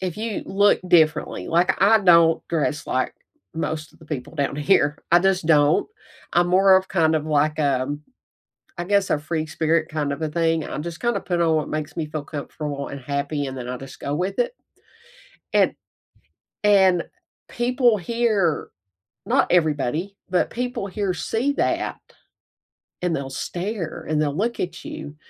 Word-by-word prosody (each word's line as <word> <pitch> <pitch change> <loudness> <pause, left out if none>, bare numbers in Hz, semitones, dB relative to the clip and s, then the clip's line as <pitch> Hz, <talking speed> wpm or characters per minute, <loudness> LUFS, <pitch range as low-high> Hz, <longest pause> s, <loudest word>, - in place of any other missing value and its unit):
if 185 -1 -3
you 220 -1 -3
look 205 +1 +3
differently 160 -3 +2
like, 175 +2 +2
I 220 +3 +6
don't 170 -4 +5
dress 155 -2 -1
like 130 - -1 0.4
most 155 -1 -3
of - - -24
the 160 - -14
people 150 -1 -6
down 140 -2 -1
here, 150 -1 +2
I 175 +1 +6
just 190 -3 +1
don't. 150 - +4 0.4
I'm 175 0 +3
more 190 +1 +6
of 190 0 0
kind 160 -4 +2
of 155 -1 0
like, 155 0 +1
um, 140 0 0 0.8
I 175 - -2
guess 200 +1 +1
a - - +2
free 155 +1 -3
spirit 160 0 0
kind 150 -2 -2
of 140 - -5
a 160 - 0
thing. 165 0 +1
I - - -5
just 170 +2 -6
kinda 240 0 0
put 175 -2 -1
on 165 -1 +3
what 155 -2 -1
makes 155 -1 -4
me 160 - -1
feel 150 -1 -5
comfortable 145 -1 -5
and 140 - -6
happy, 140 +2 -2
and 135 0 -6
then 125 -1 -6
I 125 - -3
just 135 +1 -11
go 140 - -3
with 180 +6 -2
it. - - +1 1.0
And - - +3 0.9
and 190 -4 +5 0.4
people 240 -2 +2
here, 205 -4 0 0.6
not - - +2
everybody, 160 +3 +1
but 180 -1 +1
people 245 -3 -3
here 200 -1 -2
see 245 +9 -1
that - - -1 1.0
and 175 -2 0
they'll 135 -2 -4
stare, 175 +5 -4
and 155 -1 +1
they'll 145 -2 0
look 230 +7 -1
at 175 -1 -4
you. 145 - -7
165 Hz, 170 wpm, -23 LUFS, 150-190 Hz, 1.0 s, I